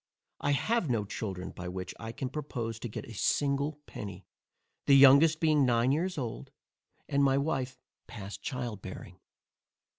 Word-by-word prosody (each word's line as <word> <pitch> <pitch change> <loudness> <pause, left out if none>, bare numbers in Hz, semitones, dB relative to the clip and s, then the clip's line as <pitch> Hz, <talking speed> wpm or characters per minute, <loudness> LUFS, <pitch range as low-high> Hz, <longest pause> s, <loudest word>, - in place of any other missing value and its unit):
I 145 - +1
have 210 - +1
no 110 -4 +1
children, 95 -3 -5
by 90 - -7
which 90 0 -5
I 115 0 -5
can 130 +1 -4
propose 125 -6 -4
to 120 - -5
get - - -6
a 115 - -10
single 140 +6 0
penny; 100 -2 -8 0.6
the 140 - +7
youngest 140 +4 +7
being 155 -3 +4
nine 120 0 +3
years 175 +5 0
old, 120 -5 -4 0.6
and 140 -1 +2
my 135 -1 +4
wife 135 -3 -1 0.3
past 100 -1 -8
child 120 -7 -4
bearing. 95 -1 -9
130 Hz, 155 wpm, -30 LUFS, 110-145 Hz, 0.6 s, the